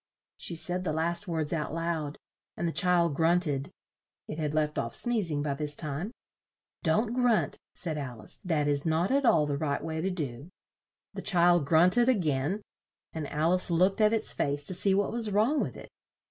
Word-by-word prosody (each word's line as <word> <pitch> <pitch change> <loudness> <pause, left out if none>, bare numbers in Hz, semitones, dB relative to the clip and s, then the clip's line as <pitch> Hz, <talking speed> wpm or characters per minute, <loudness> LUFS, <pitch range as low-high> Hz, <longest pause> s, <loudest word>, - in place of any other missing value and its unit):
She 170 - -5
said 180 +2 -2
the 155 - -1
last 170 +5 0
words 160 -3 -2
out 155 -1 -3
loud, 165 -3 -3 0.4
and 170 - -1
the - - -1
child 175 -3 +3
grunt 170 +4 +2
ed 140 -2 -2 0.6
(it 155 - -6
had 150 -1 -2
left 150 -1 0
off 115 - -3
sneez 230 -7 +1
ing 145 -2 -1
by 145 -2 -1
this 150 +1 -3
time). 155 +8 -4 0.7
"Don't 215 +8 +1
grunt," 245 -3 +1 0.2
said 160 -4 -2
Al 125 -6 -7
ice, - - -6
"that 155 -5 0
is 145 -1 +1
not 165 +4 +1
at 275 -1 +2
all 165 -10 +4
the 145 -1 -2
right 145 -3 -2
way 160 -1 -3
to 190 - 0
do." 145 -5 -5 0.6
The - - -5
child 175 -5 +3
grunt 175 +8 +5
ed 240 +1 +4
a 260 - +5
gain 160 +2 -1 0.5
and 155 -3 -5
Al 155 +4 +1
ice 185 0 +5
looked 185 +5 +2
at 215 0 +5
its 225 -1 0
face 145 0 -1
to 185 - +2
see 190 +2 +2
what 200 0 +1
was 230 -2 +1
wrong 220 +9 +2
with - - -4
it. - - -11
165 Hz, 205 wpm, -29 LUFS, 150-190 Hz, 0.7 s, grunt